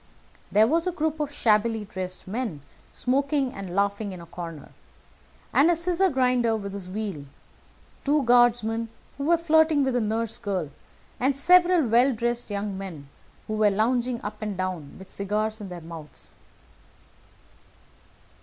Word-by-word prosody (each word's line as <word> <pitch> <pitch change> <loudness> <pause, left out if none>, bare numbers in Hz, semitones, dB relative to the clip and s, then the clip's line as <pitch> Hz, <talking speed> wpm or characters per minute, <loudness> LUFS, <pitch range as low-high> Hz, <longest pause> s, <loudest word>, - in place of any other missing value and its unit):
There 215 +2 +6
was 330 +8 +1
a - - +1
group 315 -2 -2
of 295 -1 -2
shabbily 220 -4 +2
dressed 185 -2 -6
men 210 - -3 0.3
smoking 275 +1 0
and 190 -3 -7
laughing 200 0 0
in 180 - -8
a 170 - -10
corner, 165 -2 -8 0.8
a 335 +5 +5
scissors 360 +2 +1
grinder 250 -4 +2
with 200 -2 -6
his 195 -2 -6
wheel, 195 -7 -4 0.8
two 290 0 +2
guardsmen 235 -2 +3 0.3
who 280 - -2
were 340 +2 +4
flirting 315 -3 +4
with 265 -2 0
a 245 - +2
nurse 225 +1 -2
girl, 185 -9 -3 0.5
and 265 +2 +2
several 350 +2 +5
well 245 +3 +4
dressed 240 +1 -1
young 205 -1 -3
men 160 -8 -8 0.4
who 215 - -4
were 215 -1 +4
lounging 235 +4 +1
up 210 +1 -6
and 210 -3 -3
down 185 -6 -4
with 190 0 -13
cigars 215 +2 -2
in 200 - -7
their 175 -1 -7
mouths. 160 -2 -9
225 Hz, 150 wpm, -26 LUFS, 195-270 Hz, 0.8 s, There